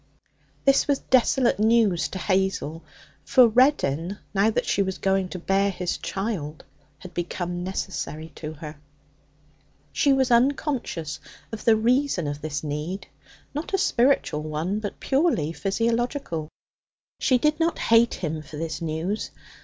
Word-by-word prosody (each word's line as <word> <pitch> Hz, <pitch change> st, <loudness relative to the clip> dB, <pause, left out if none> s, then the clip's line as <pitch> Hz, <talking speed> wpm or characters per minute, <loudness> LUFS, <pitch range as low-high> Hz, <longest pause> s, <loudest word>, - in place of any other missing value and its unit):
This 275 Hz, 0 st, +4 dB
was 285 Hz, -1 st, +2 dB
desolate 255 Hz, -3 st, +2 dB
news 215 Hz, -6 st, +3 dB
to -, -, -6 dB
Hazel; 185 Hz, -4 st, -1 dB, 0.4 s
for 255 Hz, -2 st, +6 dB
Reddin, 205 Hz, -, +2 dB, 0.2 s
now 200 Hz, +2 st, +3 dB
that 220 Hz, -, -1 dB
she -, -, +1 dB
was 190 Hz, -1 st, -1 dB
going 195 Hz, -1 st, +1 dB
to 185 Hz, -, -5 dB
bear 195 Hz, +3 st, +1 dB
his 180 Hz, -2 st, -3 dB
child, 190 Hz, -7 st, -4 dB, 0.3 s
had 175 Hz, +4 st, -12 dB
become 175 Hz, +1 st, -3 dB
necessary 165 Hz, -4 st, -4 dB
to 155 Hz, 0 st, -7 dB
her. 150 Hz, 0 st, -9 dB, 1.2 s
She 275 Hz, -, +3 dB
was 265 Hz, -1 st, +2 dB
unconscious 235 Hz, -, 0 dB, 0.3 s
of 225 Hz, -, -7 dB
the 225 Hz, -, +6 dB
reason 240 Hz, -, +1 dB
of 145 Hz, 0 st, -4 dB
this 145 Hz, -1 st, -4 dB
need 155 Hz, +6 st, -4 dB, 0.5 s
not 305 Hz, +7 st, -2 dB
a -, -, +2 dB
spiritual 250 Hz, -, +2 dB
one, 155 Hz, +6 st, -2 dB
but 205 Hz, -2 st, -6 dB
purely 265 Hz, -, +1 dB
physiological. 230 Hz, -, -1 dB, 0.7 s
She 255 Hz, -, +3 dB
did 300 Hz, +5 st, +1 dB
not 330 Hz, +1 st, +1 dB
hate 230 Hz, +1 st, +4 dB
him 160 Hz, -2 st, -3 dB
for 150 Hz, 0 st, -10 dB
this 165 Hz, +2 st, -4 dB
news. 165 Hz, +6 st, -2 dB
195 Hz, 140 wpm, -25 LUFS, 160-240 Hz, 1.2 s, for